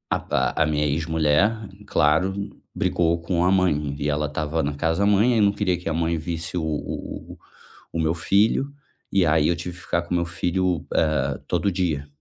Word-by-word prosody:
a - - -1
pa - - 0
a 80 - +3
minha 75 -1 0
ex 75 +2 0
mulher, 80 +8 +1 0.2
claro, 80 +6 +2 0.4
brigou 85 -1 +1
com 85 0 0
a 90 - +3
mãe 75 -7 +1
e 75 - -1
ela 75 +1 0
estava 75 +2 -2
na 75 +1 -1
casa 80 +4 0
da 100 - +3
mãe 105 +4 +4
e - - +4
não 100 -1 +5
queria 95 -3 0
que 90 -1 -5
a - - -1
mãe 85 +1 0
visse 85 +1 -4
o 85 - -1
o 75 -2 -5
o - - -14 0.6
o 85 - -2
meu 80 0 +1
filho. 100 - +2 0.4
E 95 -2 +3
aí, 75 -1 +3
eu 85 - +2
tive 85 +1 -6
que 90 - -13
ficar 85 - 0
com 85 - -16
o - - +2
meu 85 - 0
filho, 85 0 -1
eh, 75 -4 +1
todo 100 - 0
dia. 85 -6 -1
85 Hz, 215 wpm, -23 LUFS, 75-90 Hz, 0.6 s, não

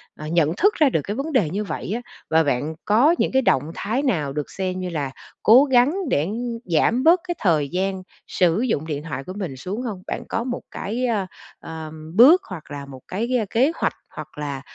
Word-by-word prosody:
ờ, 155 - -8
nhận 165 -1 +2
thức 410 +3 +4
ra 300 -4 +4
được 160 - 0
cái 205 - -4
vấn 290 +4 -3
đề 195 -12 +3
như 205 +5 -2
vậy 195 - -5
á, 245 - -3 0.3
và 160 0 +4
bạn 145 +3 -1
có 255 +11 +4
những - - +1
cái 265 0 +3
động 150 - +1
thái 250 +7 -1
nào 155 - 0
được 150 -1 -4
xem 185 -1 -3
như 180 -1 -3
là 145 -5 -3 0.3
cố 245 +6 +8
gắng 260 +2 +4 0.2
để 150 +4 +1 0.4
giảm 185 - +2
bớt 340 +3 +6
cái 350 - -2
thời 155 -7 +2
gian 190 +2 -2 0.2
sử 180 +4 +2
dụng 185 - 0
điện 150 -1 -3
thoại 135 -4 -5
của 185 - -7
mình 160 -10 -5
xuống 195 - -4
hông? 210 -7 -5
Bạn - - -4
có 230 - -1
một 245 -1 -4
cái, 235 +6 -3
ơ, 215 -5 0 0.3
ờ, 160 -1 -8 0.2
bước 300 - +8
hoặc 165 -5 -9
là 140 -1 -6
một 130 -2 -11
cái, 235 +6 -1
ơ, 215 - -1
kế 260 +7 +3
hoạch - - 0 0.2
hoặc - - -9
là, 140 -2 -4
185 Hz, 225 wpm, -22 LUFS, 155-245 Hz, 0.4 s, cố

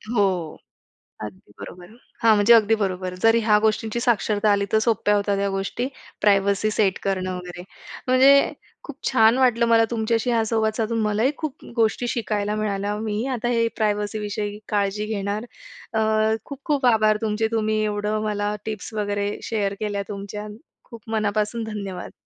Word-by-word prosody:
हो. 185 -6 0 0.7
अगदी 105 0 -10
बरोबर 175 0 -9
आहे. 225 - -17 0.3
हां, 225 -1 +6
म्हणजे 205 +3 +6
अगदी 225 -1 +5
बरोबर. 185 -2 -2
जर 225 0 +5
ह्या 210 -1 +4
गोष्टींची 220 +1 0
साक्षरता 215 -3 +1
आली 200 0 +2
तर 220 - +4
सोप्या 220 -2 +2
होत्या 200 0 +1
त्या 200 0 0
गोष्टी 195 +6 -2 0.3
प्रायव्हसी 200 +1 +2
सेट 200 -3 +1
करणं 185 -1 -1
वगैरे. 180 0 -8 0.4
म्हणजे 270 +2 +5 0.3
खूप 295 -2 -9
छान 225 -1 +4
वाटलं 245 -2 +3
मला 225 0 +5
तुमच्याशी 230 +1 0
हा 225 -1 +2
संवाद 220 -1 0
साधून. 225 0 -1
मलाही 215 +6 +1
खूप 305 -2 -6
गोष्टी 230 +1 +1
शिकायला 210 -3 -1
मिळाल्या. 205 -1 -2
मीही 215 +1 -2
आता 240 - -3
हे 230 -1 +2
प्रायव्हसी 210 -1 -1
विषयी 210 0 -4
काळजी 205 0 0
घेणार. 210 +1 -3 0.5
अ, 220 - +1 0.5
खूप-खूप 280 -1 -2
आभार 215 -2 +4
तुमचे. 220 0 0
तुम्ही 215 -1 0
एवढं 210 0 -1
मला 210 0 -1
टिप्स 220 0 -6
वगैरे 205 -1 -1
शेअर 205 -3 -1
केल्या 205 -2 -2
तुमच्या. 205 +1 -6 0.4
खूप 230 -3 -11
मनापासून 215 +1 -1
धन्यवाद. 200 -4 -6
215 Hz, 155 wpm, -23 LUFS, 205-225 Hz, 0.7 s, हां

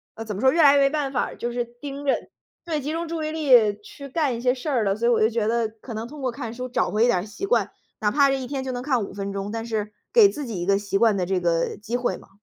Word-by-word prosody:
呃， 225 - -6
怎 210 -3 -4
么 200 - -5
说， 260 - +5
越 330 - +3
来 285 -2 +7
越 280 - +5
没 275 - +4
办 290 -2 -2
法 250 - +1
儿 - - -9
就 240 - -3
是 240 0 -2
盯 275 +4 -8
着 275 - +3 0.5
对， 325 -3 -2
集 295 +3 -3
中 335 +1 -3
注 325 -1 -3
意 310 - -2
力 245 -10 +4
去 280 +6 -11
干 275 -3 0
一 235 - -7
些 250 0 +3
事 265 +4 -5
儿 250 -6 +1
了。 195 -1 +1
所 235 +2 0
以 - - +4
我 235 - +3
就 220 - +4
觉 225 -2 -1
得 230 0 +1
可 225 +2 -11
能 220 +1 -4
通 295 +2 -10
过 255 -2 -1
看 235 -3 -6
书 255 +1 -6
找 245 - 0
回 215 +2 +2
一 - - +3
点 215 -7 +3
儿 180 - -5
习 220 - -6
惯， 465 - +1 0.3
哪 210 -2 +1
怕 280 +1 +4
这 270 0 0
一 255 - -5
天 270 -1 -3
就 260 - -3
能 245 -1 -4
看 255 -5 0
5 - - -7
分 200 0 -4
钟， 200 +1 -4
但 225 0 -4
是 215 -2 -3 0.2
给 445 -4 +8
自 295 -6 -5
己 210 -7 -4
一 - - -2
个 195 +1 +3
习 200 -1 -1
惯 220 -1 +4
的 180 - 0
这 190 0 0
个 170 -1 0
机 220 +3 -3
会 245 0 -1
嘛。 - - -17
240 Hz, 350 characters per minute, -24 LUFS, 215-280 Hz, 0.5 s, 给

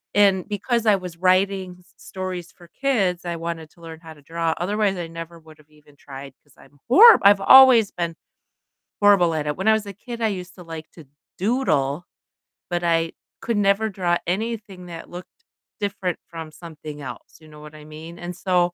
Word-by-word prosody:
and 195 -3 +3
because 230 +3 -2
I 210 -2 +5
was 180 -3 -9
writing 185 0 +1
s 180 - -25
stories 185 -2 -7
for 175 -1 -19
kids, 195 -11 0
I 170 -1 -3
wanted 165 -1 -6
to 170 - -23
learn 165 -1 -10
how 160 -1 -11
to 150 - -20
draw, 165 +1 -2
otherwise 200 +2 0
I 175 -1 -5
never 165 0 -9
would've 155 -1 -19
even 150 -1 -23
tried 135 -1 -11
'cause 145 - -26
I'm 145 - -20
horrib 455 - +9
I've 200 0 +6
always 255 -2 +8
been 170 -2 -4 0.9
horrible 190 -5 +5
at 150 -1 -2
it. 150 - -2
When 190 - 0
I 220 - +6
was 220 -1 -1
a 200 - -7
kid, 235 +4 -9
I 225 - +2
used 185 -3 -6
to 180 - -11
like 160 -1 -9
to 160 -4 -15 0.3
doodle, 175 - 0 0.6
but 175 -1 -2
I 165 -1 +1 0.3
could 230 -2 -2
never 205 +2 +2
draw 180 -3 0
anything 205 -1 -4
that 165 -1 -9
looked 180 - -12 0.4
different 200 -3 -3
from 165 -2 -9
something 155 -2 -10
else, 135 - -10
you 155 - -16
know 150 0 -14
what 150 0 -12
I 150 - -12
mean, 160 +3 -11
and 175 0 -6
so 180 -2 +1
175 Hz, 195 wpm, -22 LUFS, 165-200 Hz, 0.9 s, horrib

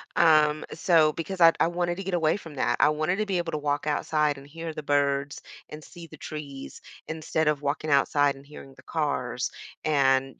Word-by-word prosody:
um, 155 -2 +4
so, 160 -2 +3
because 175 +4 -5
I 165 0 +9
I - - +4
wanted 175 +1 -2
to 195 - -5
get 190 -1 -2
away 160 -1 +2
from 165 -7 -11
that. 120 -2 0
I - - +5
wanted 155 +5 0
to 215 0 -1
be 190 -2 0
able 170 -1 -2
to 155 - -2
walk 145 0 -1
outside 150 -1 0
and 140 - -14
hear 165 +1 -7
the 155 - -6
birds 140 -1 0 0.3
and 150 0 -9
see 170 -2 -12
the 155 - -13
trees 140 -2 -8 0.3
instead 160 0 -2
of 150 -1 +1
walking 145 +2 -2
outside 140 0 +3
and 135 - -14
hearing 135 -2 -12
the 130 - -16
cars 135 -5 -2 0.3
and 135 -3 +2
150 Hz, 210 wpm, -26 LUFS, 140-165 Hz, 0.3 s, I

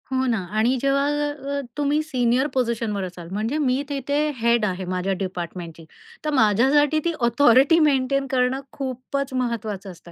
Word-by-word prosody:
हो 260 0 +1
ना 235 -2 +1 0.2
आणि 235 +4 +3
जेव्हा 275 0 +2 0.5
अ, - - -2 0.2
तुम्ही 295 +1 +1
सीनियर 255 -2 +1
पोझिशनवर 230 -5 -1
असाल 175 -2 -8
म्हणजे 220 +8 -2
मी 270 -3 +1
तिथे 285 0 -2 0.2
हेड 235 -1 +2
आहे 185 -2 -3
माझ्या 185 +1 -1
डिपार्टमेंटची. 175 -3 -6 0.4
तर - - +1
माझ्यासाठी 270 +6 +3
ती 340 - +1
ऑथॉरिटी 260 +5 +5
मेंटेन 275 -2 +2
करणं 255 +1 +1
खूपच 270 +1 -4
महत्त्वाचं 220 -6 -3
असतं 170 0 -15
250 Hz, 150 wpm, -23 LUFS, 210-275 Hz, 0.5 s, ऑथॉरिटी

